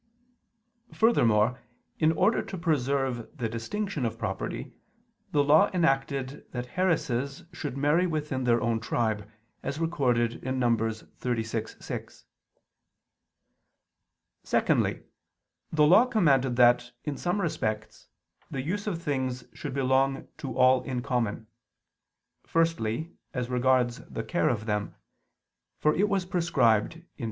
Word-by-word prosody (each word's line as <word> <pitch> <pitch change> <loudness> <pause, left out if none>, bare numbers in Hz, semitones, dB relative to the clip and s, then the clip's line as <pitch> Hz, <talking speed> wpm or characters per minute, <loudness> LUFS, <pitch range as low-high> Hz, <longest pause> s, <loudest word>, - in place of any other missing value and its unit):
Furthermore, 120 - +3 0.4
in 155 0 +4
order 190 +7 +2
to 190 - -7
preserve 135 -7 -1
the 120 -3 -1
distinction 150 - -3
of 115 - -2
property, - - -4 0.6
the 145 - +3
Law 150 +3 +5
enacted 135 -4 0
that 125 -1 -4
heiresses 150 -7 0
should 145 -6 -5
marry 150 +6 +3
within 150 -5 -2
their 120 -1 +4
own 115 -1 +1
tribe, 110 -3 -1 0.3
as 140 - -4
recorded 125 -8 0
in 130 +1 -2
Num. 120 -2 +3
36:6. 115 0 -4 2.2
Secondly, - - +1 0.7
the 150 -2 +4
Law 200 +11 +6
commanded 135 - +3
that, 120 0 +4
in 150 -2 -3
some 175 +7 -1
respects, 110 - -3 0.4
the 130 -1 -4
use 205 +8 -3
of 180 -5 -1
things 130 -3 -2
should 140 -3 -6
belong 135 0 +1
to 130 -4 -5
all 130 0 +5
in 125 -2 -4
common. 120 -5 -1 1.0
Firstly, 165 -3 0 0.2
as 125 -1 -2
regards 125 -1 +2
the - - -5
care - - +1
of 110 -2 -2
them; 105 -2 -2 0.8
for 150 - +2
it 205 +6 +2
was 195 -2 0
prescribed 165 - +1
(Deut. - - -28
130 Hz, 120 wpm, -28 LUFS, 120-160 Hz, 2.2 s, Law